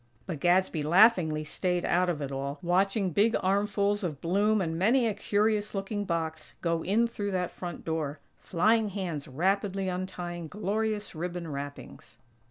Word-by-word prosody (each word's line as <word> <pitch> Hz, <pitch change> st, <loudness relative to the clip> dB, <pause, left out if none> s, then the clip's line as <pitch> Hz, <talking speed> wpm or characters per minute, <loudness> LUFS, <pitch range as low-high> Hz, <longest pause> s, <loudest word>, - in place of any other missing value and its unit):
But 170 Hz, -6 st, -5 dB
Gadsby 175 Hz, -1 st, +2 dB
laughingly 170 Hz, -2 st, +4 dB
staid 180 Hz, +3 st, -1 dB
out 180 Hz, +1 st, +2 dB
of 150 Hz, -4 st, -2 dB
it 140 Hz, -, -4 dB
all, 140 Hz, +1 st, -3 dB
watching 190 Hz, +2 st, +1 dB
big 215 Hz, +7 st, +3 dB
armfuls 205 Hz, +1 st, +1 dB
of 155 Hz, -6 st, -3 dB
bloom 205 Hz, +5 st, +2 dB
and 165 Hz, -4 st, -1 dB
many 230 Hz, +9 st, +3 dB
a 220 Hz, -, +1 dB
curious 210 Hz, +1 st, 0 dB
looking 205 Hz, +1 st, -2 dB
box 165 Hz, -3 st, -3 dB
go 165 Hz, -1 st, 0 dB
in 220 Hz, +5 st, +2 dB
through 210 Hz, -3 st, -3 dB
that 180 Hz, -1 st, -1 dB
front 175 Hz, -3 st, -7 dB
door; 155 Hz, -3 st, -2 dB, 0.2 s
flying 215 Hz, +5 st, +2 dB
hands 180 Hz, -7 st, -4 dB
rapidly 195 Hz, +6 st, 0 dB
untying 180 Hz, -2 st, -4 dB
glorious 210 Hz, +3 st, -2 dB
ribbon 175 Hz, +1 st, -4 dB
wrappings. 140 Hz, 0 st, -8 dB
185 Hz, 155 wpm, -29 LUFS, 165-205 Hz, 0.2 s, laughingly